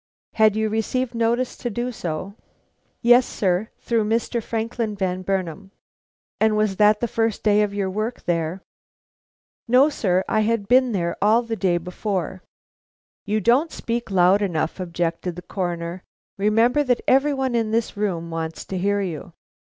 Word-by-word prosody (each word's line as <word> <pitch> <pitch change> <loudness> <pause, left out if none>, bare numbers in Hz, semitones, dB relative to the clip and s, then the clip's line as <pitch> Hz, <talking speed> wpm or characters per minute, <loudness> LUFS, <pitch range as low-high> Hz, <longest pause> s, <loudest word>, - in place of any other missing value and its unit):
"Had 215 -1 +4
you 220 0 +1
received 230 +3 -1
notice 235 +2 0
to 240 - -3
do 240 +3 -3
so?" 180 -2 -5 0.7
"Yes, 245 +2 +7
sir, 195 -1 -1
through 230 -2 +1
Mr. 230 +2 0
Franklin 225 -1 -3
Van 185 -2 -2
Burnam." 190 0 -3 0.7
"And 220 -1 +3
was 215 -3 +1
that 210 0 +4
the 240 - +1
first 225 -1 -1
day 210 -1 +4
of 210 -1 0
your 200 -1 -2
work 215 +5 -3
there?" 170 +2 -2 1.0
"No, 255 +5 +5
sir; 190 -10 0
I 215 - +1
had 215 -1 0
been 255 +1 +4
there 170 -4 -1
all 220 +4 +4
the 230 -1 -3
day 185 -5 +1
before." 185 +1 -4 0.8
"You 215 +1 0
don't 255 - +3
speak 235 0 -3
loud 190 +1 +4
enough," 175 -3 -1
objected 170 -1 -2
the 180 - -9
Coroner; 175 -1 -4 0.3
"remember 225 +7 +3
that 250 -3 +1
every 275 +2 +3
one 265 -2 -1
in 230 -2 +1
this 225 +1 -1
room 175 -5 -2
wants 165 0 -4
to 190 - -4
hear 200 +2 +1
you." 170 -6 -5
210 Hz, 160 wpm, -23 LUFS, 185-230 Hz, 1.0 s, Yes